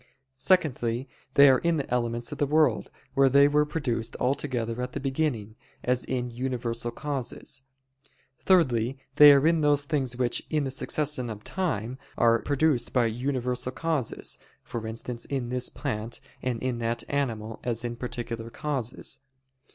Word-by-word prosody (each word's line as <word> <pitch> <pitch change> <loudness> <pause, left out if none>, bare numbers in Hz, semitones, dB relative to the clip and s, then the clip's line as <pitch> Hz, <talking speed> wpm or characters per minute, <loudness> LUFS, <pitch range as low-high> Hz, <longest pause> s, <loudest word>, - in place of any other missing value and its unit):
_ - - -24 0.3
Secondly, 130 -7 +1 0.3
they 140 0 +9
are 130 -1 +6
in 170 -1 +1
the 140 - -2
elements 120 -1 -1
of - - -6
the 145 - +2
world, 155 +1 +2 0.2
where 135 -1 +5
they 140 +2 +6
were 150 +1 +3
produced 125 -8 -2
altogether 125 -3 -1
at 125 0 -4
the - - -3
beginning, 135 -6 -1 0.3
as 125 0 +1
in 125 -1 -2
universal 120 -1 -2
causes. 135 0 -4 0.8
Thirdly, 130 - +3 0.2
they 150 -1 +11
are 140 +1 +5
in 165 0 +4
those 145 -1 +3
things 135 -5 -1
which, 125 -2 0
in 155 -2 +1
the 135 - -2
succession 140 -2 0
of 105 -1 -7
time, 130 - -2 0.2
are 115 -1 +4
produced 145 -3 +1
by 125 -2 +3
universal 125 +1 -1
causes, 160 -7 -2 0.2
for 115 -3 -5
instance 115 +1 -5
in 130 -4 -3
this 125 0 -1
plant, 115 -5 -4 0.2
and 125 -2 -2
in 125 -2 -1
that 115 0 -1
animal, 115 -6 -2
as 120 -1 -2
in 120 0 -3
_particular 115 -2 -5
causes. 135 -5 -3
125 Hz, 160 wpm, -27 LUFS, 120-145 Hz, 0.8 s, they